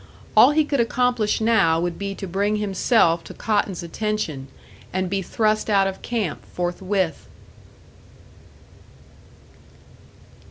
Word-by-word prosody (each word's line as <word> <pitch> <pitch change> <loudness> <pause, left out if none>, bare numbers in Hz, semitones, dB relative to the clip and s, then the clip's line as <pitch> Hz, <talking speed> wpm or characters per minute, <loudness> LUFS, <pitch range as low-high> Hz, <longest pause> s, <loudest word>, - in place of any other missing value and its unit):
All - - +8
he 305 +1 +2
could 285 -2 -1
accomplish 235 -2 +1
now 220 -8 +3
would 175 0 -3
be 200 0 -4
to 195 - -6
bring 200 +3 0
himself 195 -4 +2
to - - -10
Cotton's 205 -5 -1
attention, 170 -7 -3 0.4
and 185 0 -2
be 195 -1 0
thrust 215 +3 0
out 200 -2 +4
of 195 0 -4
camp 220 -9 -3
forthwith. 180 -1 -2
200 Hz, 115 wpm, -22 LUFS, 175-220 Hz, 0.4 s, All